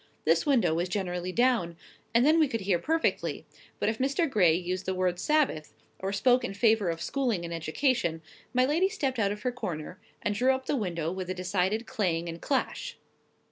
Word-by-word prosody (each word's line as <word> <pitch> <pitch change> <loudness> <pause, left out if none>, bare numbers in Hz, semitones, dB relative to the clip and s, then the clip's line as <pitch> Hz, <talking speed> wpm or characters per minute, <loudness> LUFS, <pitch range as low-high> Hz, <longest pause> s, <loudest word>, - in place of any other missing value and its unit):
This - - +3
window 230 - +3
was 175 +2 -1
generally 180 -2 -2
down, 225 -7 +1 0.3
and 235 +3 +4
then 315 +2 +5
we 310 - +4
could 230 -4 -3
hear 190 -3 +1
perfectly; 325 - -1 0.3
but - - 0
if 220 +1 -1
Mr. 280 +6 +1
Gray 185 - +4
used 180 +2 -3
the 190 - 0
word 180 -1 0
"Sabbath," 290 - 0 0.2
or 190 +1 -2
spoke 245 +5 +3
in 195 - -4
favour 220 -3 +3
of 165 0 -3
schooling 240 -11 -1
and 170 - -5
education, 165 - 0 0.3
my 255 0 +3
lady 330 +8 +2
stepped 270 - -2
out 200 -2 +2
of 210 0 -6
her 250 - 0
corner, 170 -11 -6 0.2
and 210 - 0
drew 255 +5 +3
up 260 0 -7
the - - 0
window 170 - -2
with 185 0 -5
a 185 - -2
decided 190 +4 -1
clang 170 -5 -1
and 165 0 -6
clash. 290 - -2
200 Hz, 200 wpm, -28 LUFS, 175-255 Hz, 0.3 s, then